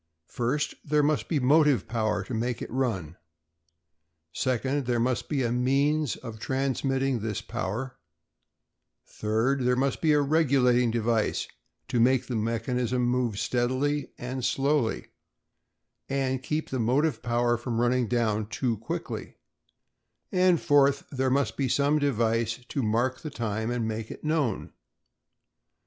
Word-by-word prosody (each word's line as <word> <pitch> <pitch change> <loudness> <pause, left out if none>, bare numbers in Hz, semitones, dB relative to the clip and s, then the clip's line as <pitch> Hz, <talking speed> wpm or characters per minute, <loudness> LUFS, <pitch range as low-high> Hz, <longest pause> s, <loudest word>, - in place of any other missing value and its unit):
First, 130 +5 -1
there 150 0 +2
must 145 -7 +1
be 160 - 0
a - - 0
motive 145 -3 +4
power 110 -3 0
to 120 - -7
make 120 +1 -2
it - - -8
run; 100 - -2 1.2
second, 130 +1 -1
there 120 -1 +1
must 120 -1 0
be 140 -4 0
a 120 - 0
means 140 +3 +1
of 110 -1 -9
transmitting 135 0 0
this 105 -1 -3
power; 120 +7 -4 1.1
third, 115 +5 0
there 125 0 +3
must 135 +1 0
be 155 -2 +4
a 150 - +4
regulating 135 -5 +3
device 115 -1 0 0.4
to 130 -3 0
make 130 +2 +3
the 125 - -4
mechanism 115 +2 -1
move 120 -3 0
steadily 130 +6 0
and 125 +1 -5
slowly, 135 -2 +1 1.0
and 135 -1 0
keep 150 +4 -3
the 130 - -1
motive 130 +3 +1
power 120 0 +1
from 120 0 -3
running 120 0 +2
down 110 -3 0
too 115 +2 -1
quickly; 110 - -5 1.0
and, 180 -2 +4
fourth, 140 -1 +3
there 130 -2 0
must 140 +2 +1
be 135 -2 0
some 145 +4 +2
device 115 -4 +1
to 140 - -1
mark 120 +3 0
the 155 - -5
time 110 -5 -3
and 120 -2 -1
make 110 0 -4
it - - -9
known. 150 -8 -1
125 Hz, 140 wpm, -27 LUFS, 115-140 Hz, 1.2 s, motive